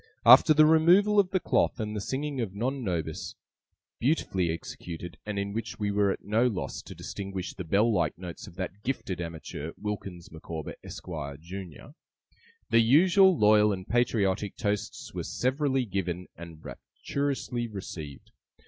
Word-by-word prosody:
After - - +9
the 155 0 +7
removal 180 +7 +5
of 195 -3 +3
the 185 - +1
cloth, - - +1
and 105 -1 -3
the 105 - -2
singing 135 +3 -3
of 100 -4 -4
Non 130 +5 -2
Nobis 85 -6 -3 0.6
(beautifully 105 - +1
executed, 85 +1 -6
and 105 -1 -3
in 100 0 -2
which 115 +1 -4
we 105 -2 -1
were 100 0 +2
at - - -3
no 110 +4 +3
loss 105 -7 -3
to - - -11
distinguish 95 -2 -5
the 95 - -6
bell 105 +8 +2
like 85 -3 0
notes 90 -2 -8
of - - -13
that 95 +2 -5
gifted 100 -8 -3
amateur, 80 -2 -6
WILKINS 100 -4 -5
MICAWBER, 80 -1 -6
ESQUIRE, 75 -6 -6
JUNIOR), 90 - -9 0.8
the 115 - +6
usual 175 - +5
loyal 105 0 +5
and 95 -1 -4
patriotic 105 -5 +1
toasts 105 0 -3
were - - -3
severally 135 0 0
given 90 -3 -3
and 85 -2 -11
rapturously 135 -4 -3
received. 80 - -8
105 Hz, 155 wpm, -28 LUFS, 90-125 Hz, 0.8 s, After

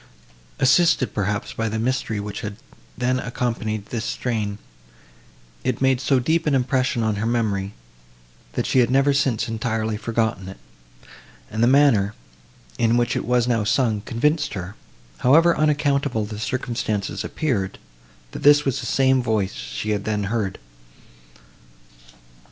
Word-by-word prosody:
Assisted, 135 - +3
perhaps, 105 0 -2
by 115 0 -2
the 110 - -3
mystery, 115 -2 -1
which 100 0 -5
had 105 -1 -6 0.4
then 125 +1 +1
accompanied 115 -4 -3
this 115 0 -4
strain, 110 -5 -2 1.1
it - - 0
had - - -19
made 130 -1 +3
so 135 - +2
deep 160 +6 0
an 145 - +3
impression 130 -2 +1
on 110 -2 0
her 105 - -2
memory, 105 -4 -1 0.8
that - - -1
she 130 - +2
had 120 -2 +3
never 135 +2 +3
since 130 -4 +1
entirely 110 -1 -2
forgotten 110 -4 -2
it; 95 - -10 0.9
and 110 - -2
the 120 - +5
manner, 125 -7 +4 0.6
in 115 0 +3
which 120 -1 +1
it - - -2
was 125 0 +2
now 115 -3 +1
sung, 110 -1 +1
convinced 150 +8 0
her, 95 +2 -6 0.4
however 165 +6 +5
unaccountable 145 -6 +1
the 105 0 -7
circumstances 115 -4 -2
appeared, 105 - -2 0.5
that - - -7
this 145 0 +6
was 135 -1 0
the 120 - -5
same 130 +1 +3
voice 110 -5 0
she - - -5
had 100 -1 -1
then 105 -1 -1
heard. 100 -5 -1
115 Hz, 145 wpm, -22 LUFS, 105-130 Hz, 1.1 s, this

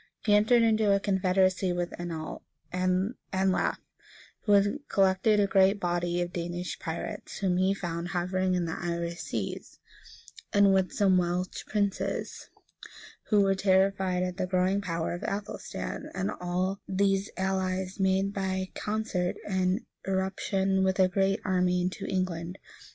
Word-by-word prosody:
He 210 - +4
entered 220 +3 +5
into 220 -2 +3
a - - +2
confederacy 190 -1 +2
with 175 0 -2
Anlaf, 165 -2 -5 0.3
who 190 +2 -2
had 205 +7 +3
collected 195 +2 +3
a 205 - +4
great 195 +1 +4
body 175 -1 0
of 175 - -7
Danish 175 +1 -4
pirates, 160 0 -5
whom 185 -2 +1
he 190 +2 +2
found 170 -2 -4
hovering 185 +1 0
in 180 -1 0
the 160 - -3
Irish 170 0 -3
seas, - - -5 0.8
and 200 -2 +5
with 190 -1 +2
some 190 -3 +3
Welsh 180 +1 -2
princes, 200 -2 -2 0.8
who 210 -2 +4
were 195 -1 +3
terrified 190 -1 +2
at 180 0 -3
the 185 -2 -1
growing 185 +2 +1
power 165 -4 -2
of 175 - -5
Athelstan; 205 +1 -4
and 190 0 -1
all 180 +2 -2
these 195 0 +1
allies 190 0 -1
made 190 +1 +2
by 190 -1 -2
concert 210 -4 -2
an 190 +3 0 0.2
irruption 190 0 0
with 190 0 +1
a 185 - +6
great 195 +2 +1
army 180 -1 +2
into 180 +1 -2
England. 185 -1 -2
190 Hz, 140 wpm, -28 LUFS, 180-195 Hz, 0.8 s, a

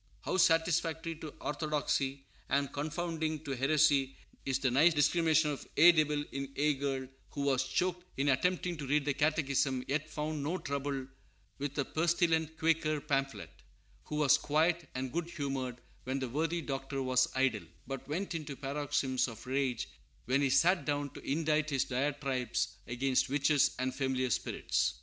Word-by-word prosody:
How - - -1
satisfactory 165 -1 +2
to 155 -1 -7
orthodoxy 145 -3 -1 0.2
and 140 0 0
confounding 155 +1 -2
to 145 - -5
heresy 135 0 +3 0.3
is 135 -1 +2
the 130 -2 0
nice 160 +6 +5
discrimination 160 0 +3
of 140 - -6
"ye 170 +4 +9
divil 150 -2 +1
in 140 0 -4
ye 150 +1 +2
girl," 135 -1 -2 0.2
who 145 - -5
was 135 -2 +2
choked 180 +2 -1
in 140 +1 +2
attempting 180 +5 +1
to 145 -2 -6
read 145 +1 +2
the 145 - +1
Catechism, 140 -4 +1
yet 150 +3 -1
found 155 0 -3
no 160 +6 -1
trouble 140 -3 -3 0.5
with 145 +1 -4
a 140 - +1
pestilent 160 -1 +1
Quaker 160 -2 +1
pamphlet; 135 -2 -2 0.5
who 150 - -5
was 150 -2 +4
quiet 160 +1 +1
and 130 0 -3
good 170 0 -2
humored 135 -6 -3 0.3
when 130 +1 -1
the 130 -2 -3
worthy 165 +6 -1
Doctor 135 -1 -3
was 130 0 +3
idle, 130 -9 +1 0.2
but 135 +1 -6
went 175 +6 -3
into 155 -4 -5
paroxysms 135 -2 -1
of 115 -3 -9
rage 130 -2 -1 0.4
when 130 +3 +2
he 140 - +2
sat 170 +7 +4
down 145 -1 -1
to - - -10
indite 155 +1 0
his 135 -3 +1
diatribes 135 -2 -1
against 130 +2 +1
witches 145 +1 +3
and 130 0 -1
familiar 130 -1 -1
spirits! - - 0
145 Hz, 160 wpm, -32 LUFS, 135-155 Hz, 0.5 s, ye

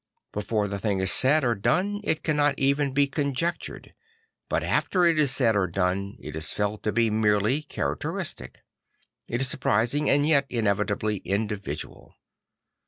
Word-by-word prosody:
Before 105 0 -1
the 100 0 -4
thing 100 0 0
is 95 0 +2
said 145 +4 +4
or 120 -2 +2
done 190 - 0
it 160 -6 0
cannot 145 -2 +2
even 140 +1 +1
be 140 +1 +3
conjectured; 140 +4 -3 0.6
but - - 0
after 180 -2 +1
it 165 -2 +3
is 145 -2 +3
said 125 -4 +2
or 100 -2 +2
done 95 +3 -2
it 75 - -8
is 80 -1 -2
felt 105 0 -2
to 105 - -1
be 115 0 +1
merely 105 +5 +2
characteristic. 75 - -4 0.6
It 120 +2 -2
is 135 - +1
surprisingly 125 +4 +1
and 145 +1 +3
yet 140 -3 +3
inevi 105 -3 0
tably 105 0 -2
individual. 105 0 -4
115 Hz, 160 wpm, -26 LUFS, 100-145 Hz, 0.6 s, said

